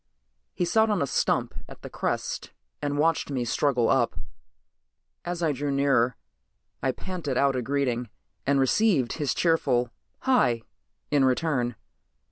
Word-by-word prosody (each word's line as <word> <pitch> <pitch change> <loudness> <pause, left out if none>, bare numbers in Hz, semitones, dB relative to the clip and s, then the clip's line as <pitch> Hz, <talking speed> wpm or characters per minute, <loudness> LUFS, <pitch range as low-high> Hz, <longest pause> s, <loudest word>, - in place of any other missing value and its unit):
He 175 - 0
sat 220 +5 +3
on 205 -3 +1
a - - +1
stump - - 0 0.2
at - - -12
the - - -7
crest - - -3 0.3
and 145 -1 -1
watched 160 +1 +1
me 130 -4 -1
struggle 125 -1 +1
up. 125 -3 +2 1.1
As 175 0 -3
I 160 - +3
drew 145 +1 -3
nearer 135 -3 +2 0.7
I 130 - +1
panted 160 -4 -4
out 140 -1 +3
a 130 - 0
greeting 125 -2 -1 0.4
and 140 0 +3
received 135 - +2
his 145 -5 -1
cheerful 130 -8 +2 0.3
"Hi" 125 - +2 0.5
in 145 -2 +4
return. 130 -2 +1
140 Hz, 140 wpm, -26 LUFS, 125-160 Hz, 1.1 s, in